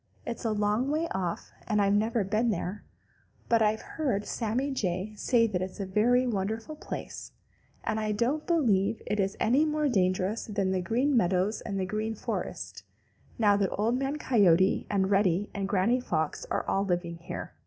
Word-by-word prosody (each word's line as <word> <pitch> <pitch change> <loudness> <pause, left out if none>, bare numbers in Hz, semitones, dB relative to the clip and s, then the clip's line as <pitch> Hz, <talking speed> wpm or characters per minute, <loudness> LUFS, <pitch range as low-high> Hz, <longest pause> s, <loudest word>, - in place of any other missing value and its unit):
It's 235 - -5
a 225 - 0
long 210 +5 +1
way 315 +3 0
off 180 -3 -3 0.2
and 210 -2 +1
I've 200 0 +3
never 220 +1 +2
been 215 +5 +1
there, 200 0 -3 0.7
but 230 -1 +4
I've 215 0 +2
heard 255 -10 -2
Sammy 245 +5 -1
Jay 190 -4 -2
say 230 +2 +3
that 195 -5 -1
it's 185 +1 -5
a 195 - -2
very 235 +6 +3
wonderful 220 +5 -2
place, 305 - -7 0.5
and 220 - -1
I 215 -1 -1
don't 245 +9 0
believe 225 - +2
it 210 - -1
is 195 0 0
any 250 +6 +3
more 305 -1 +1
dangerous 190 -1 0
than 200 -3 0
the 185 -1 0
Green 250 +10 +1
Meadows 190 0 +1
and 195 -2 -3
the 190 - 0
Green 215 +3 -2
Forest, - - -5 0.6
now 210 -4 +4
that 195 -2 0
Old 220 +4 +1
Man 270 +3 -1
Coyote 195 - +3
and 195 -1 +1
Reddy 195 0 +2
and 195 -1 -3
Granny 210 +6 +2
Fox 160 -10 -2
are - - -1
all 195 - +1
living 175 -3 -2
here. 170 - -7
210 Hz, 180 wpm, -28 LUFS, 190-235 Hz, 0.7 s, but